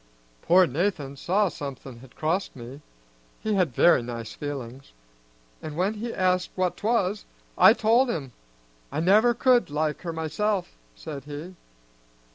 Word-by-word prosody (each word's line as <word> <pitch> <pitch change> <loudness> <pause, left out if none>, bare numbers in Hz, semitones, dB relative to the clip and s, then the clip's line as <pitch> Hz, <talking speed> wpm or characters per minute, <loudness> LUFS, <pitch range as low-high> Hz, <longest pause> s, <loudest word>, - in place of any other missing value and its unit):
Poor 185 +1 +5
Nathan 150 -2 -2
saw 195 +8 +1
somethin' 135 -6 -7
had 130 0 -16
crossed 170 +5 -1
me, 130 +3 -10 0.6
he 220 - -2
had 180 -7 +2
very 150 +3 +4
nice 115 -2 -6
feelings, 135 - -7 0.7
and 155 -1 -7
when 190 +4 +1
he 230 +2 -5
asked 185 -2 +1
what 185 -1 0
'twas, 210 -2 0 0.3
I 220 - +7
told 235 +3 +3
him. 140 - -4 0.6
'I - - -2
never 215 +7 +4
could 250 - +3
like 150 +1 -2
her 175 - -4
myself,' 175 +5 -2 0.2
said 130 - -8
he. 150 +5 -8
170 Hz, 140 wpm, -26 LUFS, 140-205 Hz, 0.7 s, I